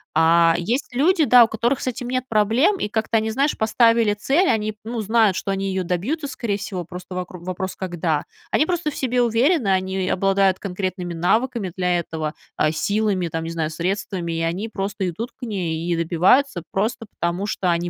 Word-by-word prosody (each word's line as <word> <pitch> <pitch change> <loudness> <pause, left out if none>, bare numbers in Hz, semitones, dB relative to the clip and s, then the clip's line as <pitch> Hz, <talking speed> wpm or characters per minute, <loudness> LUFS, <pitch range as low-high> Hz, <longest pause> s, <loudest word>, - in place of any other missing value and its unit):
А 165 +1 +5
есть 240 +10 -2
люди, 315 +6 +3
да, 245 -4 +7
у - - -5
которых 235 +4 0
с - - -5
этим 245 0 -3
нет 255 0 -1
проблем, 230 - +3
и - - -2
как-то 225 +1 0
они, 220 0 0
знаешь, 275 +5 +1
поставили 225 0 +3
цель, 275 - +1
они, 215 -1 0
ну, 230 +1 -4
знают, 215 -2 +3
что - - -4
они 195 0 -1
её 190 -1 -1
добьются, 230 - -2
скорее 225 -6 -3
всего, 185 -3 -5
просто 180 +1 -9
вокру 180 -1 -6
вопрос- 185 +1 -4
когда. 175 -4 -2 0.3
Они 305 - +3
просто 340 -3 -1
в - - -10
себе 250 -1 0
уверены, 240 - +2
они 190 0 0
обладают 195 0 +2
конкретными 185 -2 -4
навыками 215 +4 0
для 180 -1 +1
этого, 155 -2 -4 0.2
а, 155 - +2
силами, 200 0 0
там, 165 0 -3
не - - -4
знаю, 160 -2 -2
средствами, 175 +1 -3
и 165 - -2
они 175 +6 -2
просто 195 -2 -3
идут 225 +9 -5
к - - -17
ней 175 -7 -3
и 170 - +2
добиваются, 175 - +2
просто 220 +4 -1
потому 175 +4 -2
что 185 -4 0
они 170 +1 -1
195 Hz, 195 wpm, -22 LUFS, 175-235 Hz, 0.3 s, да